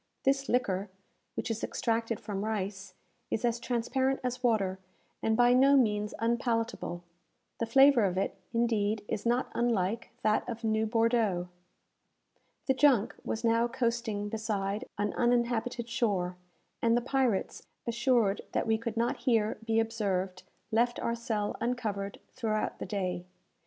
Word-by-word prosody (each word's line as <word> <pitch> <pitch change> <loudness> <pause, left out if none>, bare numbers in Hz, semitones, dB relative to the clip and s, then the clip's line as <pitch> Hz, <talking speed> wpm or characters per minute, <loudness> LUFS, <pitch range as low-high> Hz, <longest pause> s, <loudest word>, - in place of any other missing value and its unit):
This 275 0 +1
liquor, 200 -5 0 0.5
which - - -2
is 225 - -4
extracted 230 -2 -1
from 200 -1 -4
rice, 200 -3 -3 0.3
is 225 - -1
as 235 0 +1
transparent 260 +3 0
as 250 0 -2
water, 200 -6 +1 0.4
and 220 0 +1
by 245 0 +6
no 275 +2 +6
means 210 -4 +1
unpalatable. 230 -6 -1 0.6
The 230 - -1
flavour 270 -1 +6
of 185 -1 -1
it, 195 - 0 0.2
indeed, 220 -3 +1
is 215 +2 -2
not 240 +2 +1
unlike 230 -2 0
that 215 +3 +2
of 230 0 -5
new 220 0 +1
Bordeaux. 225 -6 +1 1.2
The 265 - +3
junk 260 -5 +3
was 225 - -3
now 230 0 +3
coasting 235 -4 -1
beside 210 0 -2
an 205 0 -1
uninhabited 240 0 +1
shore, 200 -7 0 0.5
and 230 0 +4
the - - +1
pirates, 250 -5 0 0.2
assured 235 -3 +2
that - - +1
we 220 -1 +2
could 230 0 -4
not 235 +1 +1
here 230 -4 +1
be 225 0 +2
observed, 195 -5 -1 0.3
left 240 +2 +2
our 235 - -1
cell 220 -3 -2
uncovered 215 -5 -2
throughout 220 -4 -2
the - - -5
day. 185 -3 -2
225 Hz, 140 wpm, -30 LUFS, 205-240 Hz, 1.2 s, by